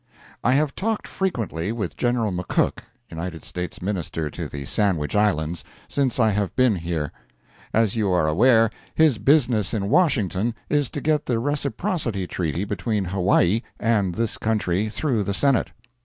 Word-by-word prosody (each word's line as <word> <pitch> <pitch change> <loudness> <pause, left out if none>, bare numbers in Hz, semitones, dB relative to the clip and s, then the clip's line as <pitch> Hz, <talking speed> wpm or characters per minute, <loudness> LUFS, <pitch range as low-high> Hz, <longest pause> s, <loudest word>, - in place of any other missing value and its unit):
I 125 - +3
have 145 +1 +2
talked 220 +2 -2
frequently 110 - -2
with 105 -6 -4
General 120 -3 0
McCook, 90 -1 0 0.3
United 85 0 -5
States 90 0 -5
Minister 85 -5 -2
to - - -5
the 70 -1 -6
Sandwich 90 -4 0
Islands, 85 -6 +1 0.2
since 135 -3 0
I 110 -2 +4
have 100 -1 -1
been 125 -6 +3
here. 85 -4 -3 0.6
As 110 -2 +2
you 105 -3 +1
are 90 -4 +2
aware, 115 +7 +4 0.2
his 155 -8 +4
business 120 -4 +3
in 100 -2 -1
Washington 115 - +2 0.2
is 145 -3 +2
to 145 - -5
get 150 0 +1
the 120 - +1
reciprocity 140 - -1
treaty 85 +1 -2
between 105 0 -1
Hawaii 95 +2 +2 0.2
and 105 -6 +1
this 115 -1 -1
country 105 -2 0
through 115 -2 0
the 100 0 -2
Senate. 140 -1 +2
105 Hz, 155 wpm, -23 LUFS, 90-125 Hz, 0.6 s, I